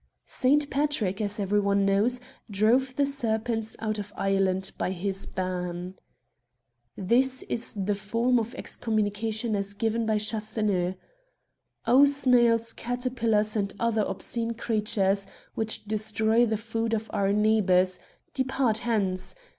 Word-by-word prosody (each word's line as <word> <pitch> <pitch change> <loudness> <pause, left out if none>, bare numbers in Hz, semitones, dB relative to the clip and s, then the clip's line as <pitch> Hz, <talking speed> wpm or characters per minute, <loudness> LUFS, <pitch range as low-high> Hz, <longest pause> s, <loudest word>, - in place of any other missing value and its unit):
Saint 285 +3 +2
Patrick, 265 -9 0
as 205 0 -1
every 205 +1 +1
one 200 0 +2
knows, 210 +6 +3 0.3
drove 235 +6 +2
the 285 - +2
serpents 225 -4 -2
out 215 -1 -2
of 205 0 -6
Ireland 195 -1 +1
by - - -2
his 195 +1 -2
ban. 180 -1 -4 1.0
This 255 +7 +2
is 230 - -4
the 200 0 -1
form 230 +5 +1
of 230 +1 -5
excommunication 220 0 -1
as 200 0 -3
given 225 +1 -1
by 215 -1 +2
Chasseneux: 210 -4 0 0.3
— - - -49
" - - -49
O 265 +4 +6
snails, 240 -5 +3
caterpillars, 235 -4 -1
and 200 -2 -1
other 230 -2 +1
obscene 230 +2 -2
creatures, 210 -4 0 0.3
which 220 -1 -2
destroy 220 +2 +1
the 220 -1 0
food 225 +1 -2
of 220 0 -4
our 200 -1 +1
neighbours, 195 -4 +3 0.3
depart 260 -4 +1
hence 195 - -1
220 Hz, 130 wpm, -27 LUFS, 200-235 Hz, 1.0 s, O